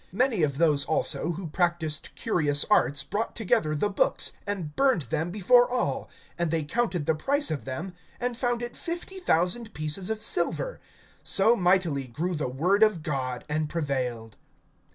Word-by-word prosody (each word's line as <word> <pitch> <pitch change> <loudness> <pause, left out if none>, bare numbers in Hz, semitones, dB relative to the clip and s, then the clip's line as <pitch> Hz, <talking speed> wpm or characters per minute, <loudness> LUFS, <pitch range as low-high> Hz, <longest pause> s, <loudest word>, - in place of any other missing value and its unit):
(19)Many 240 -6 +2
of 140 -2 0
those 150 -3 +4
also 165 +2 0
who 180 +3 -6
practiced 165 -2 0
curious 150 -9 +1
arts 140 0 +4
brought 215 +3 -3
together 155 -8 +1
the 150 - +1
books, 200 - +1 0.2
and 180 -7 -4
burned 265 - +3
them 160 +7 -2
before 225 +6 +4
all; 250 0 -1 0.3
and 170 -1 +1
they 160 -1 0
counted 180 -1 -1
the 160 - +2
price 280 - 0
of 150 - -3
them, 160 +8 -5 0.3
and 245 -1 -2
found 240 0 -1
it 240 0 -6
fifty 350 +3 -5
thousand 210 - +1
pieces 155 +5 -2
of 220 -1 -1
silver. - - -1 0.4
(20)So 220 +5 +3
mightily 175 - +1
grew 165 +10 -3
the 150 -5 -2
word 180 +11 +1
of 215 -7 +4
God 130 -5 -3
and 155 0 -1
prevailed. 125 -9 -3
170 Hz, 165 wpm, -27 LUFS, 150-220 Hz, 0.4 s, those